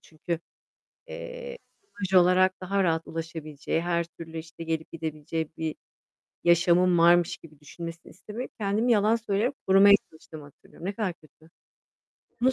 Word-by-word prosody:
çünkü, 165 +1 -5 0.7
eee, - - -7 0.3
imaj 195 - -5
olarak 185 +1 +3
daha 195 +2 0
rahat 165 -2 0
ulaşabileceği, 160 -2 -4
her 170 0 0
türlü, 165 -1 -9
işte, 165 +1 -9
gelip 160 -1 -3
gidebileceği 160 0 -4
bir 160 -1 -2 0.7
yaşamım 175 +1 +4
varmış 175 +1 +5
gibi 155 -3 -17
düşünmesini 165 +2 -9
istemeyip, 215 +6 -7
kendimi 215 +3 +1
yalan 215 +1 +4
söyleyip 225 +3 -1
korumaya 195 +1 +7 0.2
çalıştığımı 155 -1 -12
hatırlıyorum. 145 +4 -13
Ne 200 - -1
kadar 200 -4 -2
kötü. 155 0 -23 0.9
Bunu 260 +2 +4
170 Hz, 135 wpm, -27 LUFS, 160-200 Hz, 0.9 s, korumaya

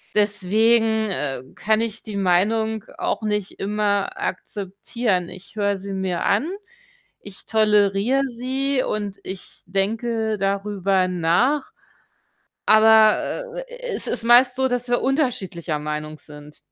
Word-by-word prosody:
deswegen, 220 +2 +2
äh, 135 -7 -3
kann 220 +1 +1
ich 225 -1 -4
die 215 -2 -7
Meinung 215 +4 +1
auch - - -2
nicht 210 -2 -2
immer 205 0 -1
akzeptieren. 195 0 -3
Ich 185 +4 -13
höre 200 -1 +1
sie 195 +1 -7
mir 190 -2 -2
an, 240 - +2 0.7
ich 200 -2 -12
toleriere 210 +4 +3
sie 260 +3 -1
und 205 -2 -3
ich 190 0 -9
denke 220 +3 -1
darüber 195 -1 0
nach, 180 - +1 0.9
aber, 220 - +4
äh, - - -7
es - - -3
ist - - -2
meist 250 +2 +6
so, 265 0 +2
dass 245 0 -2
wir 245 - +2
unterschiedlicher 195 - -1
Meinung 150 0 -5
sind. 150 0 -13
210 Hz, 120 wpm, -22 LUFS, 190-230 Hz, 0.9 s, meist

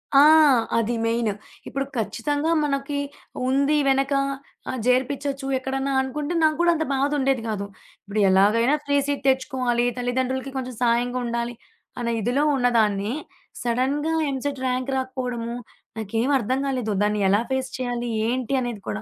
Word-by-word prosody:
ఆ! 275 - +9 0.6
అది 230 +1 +1
మెయిన్ 230 -1 +1 0.4
ఇప్పుడు 275 0 -2
ఖచ్చితంగా 290 +8 -1
మనకి 285 0 -1 0.5
ఉంది 280 +3 +2
వెనక 270 +1 +2 0.6
ఆహ్, 260 - -2
జేరిపించొచ్చు 270 +2 0
ఎక్కడన్నా 270 +1 -2
అనుకుంటే 290 +5 -3
నాకు 310 -1 +4
కూడా 345 0 +5
అంత 315 -1 -1
బాధ 275 +2 +1
ఉండేది 265 -2 +1
కాదు. 200 -2 -2 0.4
ఇప్పుడు 205 +1 -2
ఎలాగైనా 215 +8 +4
ఫ్రీ 285 0 +2
సీట్ 285 -1 -2
తెచ్చుకోవాలి. 255 -2 +1
తల్లిదండ్రులకి 260 +2 -1
కొంచెం 255 -1 -4
సాయంగా 245 +1 +1
ఉండాలి 235 0 -2 0.5
అన్న 235 -1 -1
ఇదిలో 250 +7 +1
ఉన్నదాన్ని, 220 -4 +2 0.5
సడన్‌గా 265 +6 0 0.2
ఎంసెట్ 275 0 -3
ర్యాంక్ 255 +1 -1
రాకపోవడము, 250 -3 -3 0.4
నాకేమీ 225 +6 0
అర్థం 255 +4 -1
కాలేదు. 250 -5 -1
దాన్ని 210 0 +1
ఎలా 205 +3 +4
ఫేస్ 265 -1 -1
చేయాలి? 245 -1 -2 0.2
ఏంటి 255 +1 -1
అనేది 235 -5 -4
కూడా. 215 - -3
255 Hz, 140 wpm, -24 LUFS, 235-275 Hz, 0.6 s, ఆ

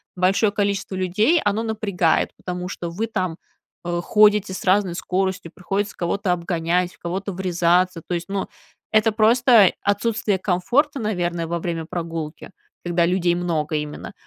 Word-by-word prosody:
большое 195 +3 +2
количество 200 -2 -1
людей, 210 - +2
оно 205 +2 +1
напрягает, 200 -7 0
потому 180 0 -5
что 170 -3 -5
вы 215 +7 -3
там, 185 -6 -2 0.5
э, 175 0 -2
ходите 210 -1 +4
с - - -6
разной 185 -2 +2
скоростью, 185 -2 -2
приходится 195 +3 -3
кого-то 185 +2 -1
обгонять, 175 0 0
в - - -24
кого-то 190 +3 -4
врезаться, 180 -1 +1
то 180 - -3
есть, 175 +1 -3
ну, 195 -1 -2 0.5
это 215 +1 +4
просто 225 -1 +5
отсутствие 205 0 0
комфорта, 250 - +1
наверное, 175 -5 -2
во 170 0 -2
время 165 -2 -3
прогулки, 165 -2 -5 0.4
когда 170 -1 +2
людей 175 -1 +1
много 160 -3 -1
именно. 150 0 -5
185 Hz, 145 wpm, -22 LUFS, 175-205 Hz, 0.5 s, просто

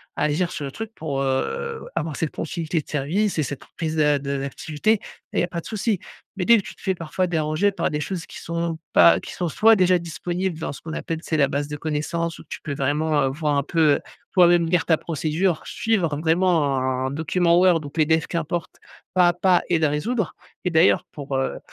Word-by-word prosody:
à - - -1
agir 155 +4 +1
sur 150 - -4
le 135 - -5
truc 225 +8 -6
pour, 140 -4 -3
heu, 460 - -2
avoir 160 -3 -2
cette 160 - -1
continuité 165 0 -2
de - - -21
service 165 +7 0
et - - +3
cette 140 0 -5
prise 160 -2 -2
d'a 150 -2 +3
de 140 0 -3
d'activité 150 +8 0
et 210 - -8 0.4
il - - +4
y - - +2
a - - 0
pas 170 -1 -4
de - - -20
souci. 215 -2 -1 0.4
Mais 190 - -2
dès 235 +6 +6
que 205 - -2
tu - - -10
te - - -21
fais 190 - 0
parfois 175 +1 -2
déranger 160 +3 +1
par 200 - -1
des 150 0 -2
choses 175 0 -4
qui - - -11
sont 170 -1 -3
pas 85 -1 +6
qui - - -8
sont, 175 - -2
soit 220 +8 +5
déjà 185 -1 +4
disponibles 175 +1 -3
dans 160 - -3
ce - - -11
qu'on 160 - -7
appelle, 160 0 -4
tu - - -26
sais, 160 - +1
la 140 -2 +4
base 145 +1 -2
de 150 - -4
connaissance 160 +2 -2
où - - -12
tu - - -6
peux 145 - -4
vraiment 145 +1 +1
voir 150 +1 -1
un 140 - +1
peu, 165 +4 -2 0.2
heu, - - -2 0.3
toi-même 175 -2 +5
lire 175 -1 +2
ta 160 - +3
procédure, 160 +2 -1
suivre 180 -10 0
vraiment 160 -2 +2
un 130 0 -1
document 170 +3 +2
Word 180 -2 +5
ou - - -6
PDF 160 +1 +1
qu'importe 170 0 -3 0.4
pas 180 -1 +5
à - - +1
pas 180 +1 +3
et 170 - +3
le 160 - +3
résoudre 190 +8 -1 0.3
et - - +2
d'ailleurs 160 +2 +4
pour, 140 -2 -6
heu 135 - -2
165 Hz, 230 wpm, -23 LUFS, 150-180 Hz, 0.4 s, dès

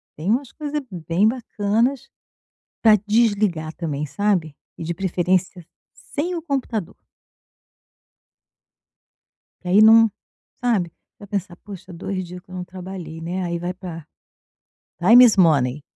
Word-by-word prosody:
tem 160 +6 -4
umas 245 +3 0
coisa 295 -1 -4
bem 175 +4 +1
bacanas 230 +2 -1 0.7
pra 220 -2 +7
desligar 205 -8 +1
também, 150 -3 -3
sabe. 180 -4 -1 0.2
E 165 - -6
de 170 - -3
preferência 180 -1 -1 0.5
sem 345 +5 -1
o 330 - -5
computador. 255 - -3 2.7
Porque 180 - -10
aí 200 +4 +5
não 225 0 +7 0.5
sabe, 210 -8 +1
você - - -52
vai 205 - -11
pensar: 195 -3 -4
"Poxa, 190 -2 -11
2 185 +2 -4
dias 180 +1 -10
que - - -33
eu - - -8
não 180 -1 -5
trabalhei, 180 -3 -8
né". 180 +3 -3
Aí 170 -1 -3
vai 175 +1 -3
pra 175 -4 -9 0.9
time 230 +8 +8
is 225 - +5
money. 150 -6 +3
185 Hz, 135 wpm, -22 LUFS, 170-220 Hz, 2.7 s, time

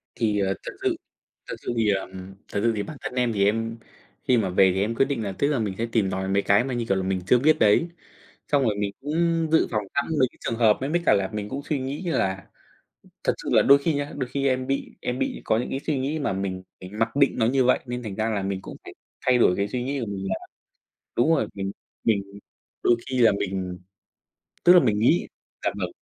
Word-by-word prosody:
Thì, 105 -3 +1
ờ, 95 -1 +1
thật - - -5
sự - - +2 0.5
thật - - -4
sự - - -2
thì, 110 -2 +2
ờm, 95 -1 -1 0.4
thật 100 - 0
sự 115 0 +3
thì 105 - -1
bản 155 - -8
thân - - -5
em 125 -2 +1
thì 100 -2 +2
em 115 +2 0 0.5
khi 125 - +5
mà 110 -5 +1
về 95 +1 +5
thì 95 - 0
em 110 +4 0
quyết 135 - +3
định 135 -4 -2
là 100 - -3
tức 140 - +2
là 145 -3 +1
mình 105 -4 -2
sẽ 115 - 0
tìm 100 -5 +2
tòi 95 0 -2
mấy 100 +1 +2
cái 100 +4 +3
mà 130 -1 -3
như 120 -1 -1
kiểu 95 - +2
là 95 - 0
mình 95 0 -1
chưa 125 - +5
biết 155 +5 +4
đấy, 105 +11 +4 0.6
xong 145 -1 +4
rồi 110 -4 +1
mình 100 -1 -1
cũng 165 +3 0
dự 160 - +5
phòng 105 -2 0
sẵn 140 - +1
mấy 130 - +4
cái - - -26
trường 115 - -3
hợp. 110 -3 +4
Mấy 135 +2 -2
mấy 170 +2 +1
cả - - +6
là 95 -1 0
mình 105 -1 -4
cũng 140 +6 -5
suy 145 -1 -2
nghĩ 135 +5 -4
là 95 - -1 0.8
thật - - +3
sự - - -7
là - - +6
đôi 140 +1 +7
khi 150 +3 0
nhá, 145 0 -3
đôi 130 -3 -3
khi 140 +1 0
em 130 0 0
bị 135 +1 -3
em 125 +1 -3
bị - - -2
có 110 - +2
những 120 - -3
cái 135 - -2
suy 150 -3 0
nghĩ 140 +4 -1
mà 140 - -1
mình 95 -1 -3 0.2
mình 95 +3 -9
mặc 115 +2 0
định 140 -1 +4
nó 110 - +3
như 130 +2 +2
vậy, 130 - +4
nên 125 0 -4
thành 105 -4 -5
ra 110 +2 -1
là 105 -3 -1
mình 95 0 -2
cũng - - -9
phải - - -10 0.3
thay 125 -1 +5
đổi 90 -6 +4
cái 100 +1 0
suy 125 +3 -3
nghĩ 140 +1 -2
của 115 - -3
mình 100 -1 -4
là - - 0 0.8
đúng 120 +6 +3
rồi, 110 - 0
mình 95 -1 -3 0.3
mình 105 -4 +2 0.6
đôi 120 - +5
khi 130 - -1
là 115 - +6
mình 95 -2 -3 0.8
tức 175 - +8
là 180 - +9
mình 110 -9 +1
nghĩ 125 +10 +3 0.4
dạ - - +2
vâng. - - -3
115 Hz, 265 wpm, -25 LUFS, 100-135 Hz, 0.8 s, là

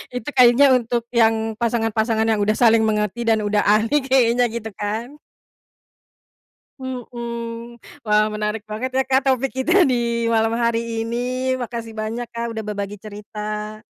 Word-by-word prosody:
Itu 250 +3 -4
kayaknya 250 +3 +7
untuk 235 -1 -2
yang 225 -1 +2
pasangan-pasangan 225 -1 0
yang 215 -1 +1
udah 215 +1 +2
saling 230 -2 +5
mengerti 210 +2 -1
dan 225 -1 +2
udah 210 0 +1
ahli 220 +7 +3
kayaknya, 245 -2 +3
gitu 225 -1 -5
kan. 225 +7 -4 1.6
Mhm. 235 -2 -6 0.3
Wah, 210 0 +3
menarik 210 0 -3
banget 220 +5 -3
ya, 265 - +3
Kak, 265 +1 +1
topik 265 0 +1
kita 340 +9 +3
di 235 -4 0
malam 225 0 +2
hari 230 -1 -1
ini, 250 +3 -2
Makasih 230 -2 -5
banyak, 220 +3 -3
Kak, 235 0 -4
udah 220 - -4
berbagi 205 -1 -4
cerita. 210 +1 -7
230 Hz, 140 wpm, -21 LUFS, 215-245 Hz, 1.6 s, kayaknya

